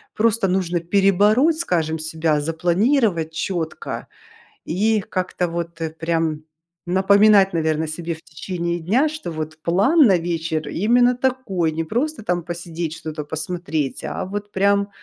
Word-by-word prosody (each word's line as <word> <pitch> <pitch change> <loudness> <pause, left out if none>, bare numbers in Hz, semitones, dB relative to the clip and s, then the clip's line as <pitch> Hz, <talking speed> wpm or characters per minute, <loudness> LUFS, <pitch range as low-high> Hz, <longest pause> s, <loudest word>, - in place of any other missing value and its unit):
просто 225 -2 +2
нужно 180 -2 0
перебороть, 205 - +3
скажем, 165 - 0
себя, 160 -1 0
запланировать 175 - +1
четко 165 -1 -4 0.6
и 215 +5 +1
как-то, 185 -1 -2
вот, 170 0 -5
э, 160 - -1
прям, 160 -1 -1 0.4
напоминать, 195 +2 +5
наверно, 160 -1 0
себе 165 +2 -4
в 160 - -18
течение 170 +2 -4
дня, 230 - +2
что, 310 - -6
вот 155 0 -5
план 200 - +3
на 190 -3 +4
вечер 165 -2 -2
именно 245 +5 +3
такой. 250 -10 0
Не 160 +1 -2
просто, 250 - -2
там, 175 -3 -1
посидеть, 170 -1 -5
что-то 155 -2 -6
посмотреть, 160 -2 -3
а - - -4
вот, 205 +2 -6
прям, 200 +1 +2
175 Hz, 135 wpm, -21 LUFS, 160-205 Hz, 0.6 s, напоминать